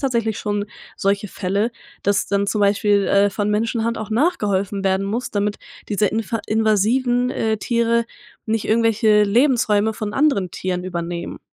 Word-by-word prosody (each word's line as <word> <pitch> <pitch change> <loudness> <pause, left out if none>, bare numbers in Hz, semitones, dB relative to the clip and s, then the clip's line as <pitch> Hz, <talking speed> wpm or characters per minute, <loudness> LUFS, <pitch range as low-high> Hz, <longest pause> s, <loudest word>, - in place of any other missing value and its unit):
tatsächlich 235 -6 -1
schon 205 0 -2 0.3
solche 200 +1 0
Fälle, 200 +6 -1 0.3
dass 200 0 +1
dann 200 0 +1
zum 210 0 -1
Beispiel, 200 0 +2
äh, 200 0 +3
von 205 +1 -1
Menschenhand 230 +2 0
auch 220 0 -6
nachgeholfen 205 - 0
werden 190 +1 +1
muss, 230 +5 -3
damit 205 0 -1 0.3
diese 210 0 +1
infa 225 +1 -2
invasiven, 230 +4 +2
äh, 220 -4 -1
Tiere 235 +1 +1 0.4
nicht 220 -1 -1
irgendwelche 220 -1 +3
Lebensräume 220 -2 +2
von 210 -1 -4
anderen 270 - +1
Tieren 180 -1 -3
übernehmen. 170 -1 -5
210 Hz, 145 wpm, -20 LUFS, 200-230 Hz, 0.4 s, äh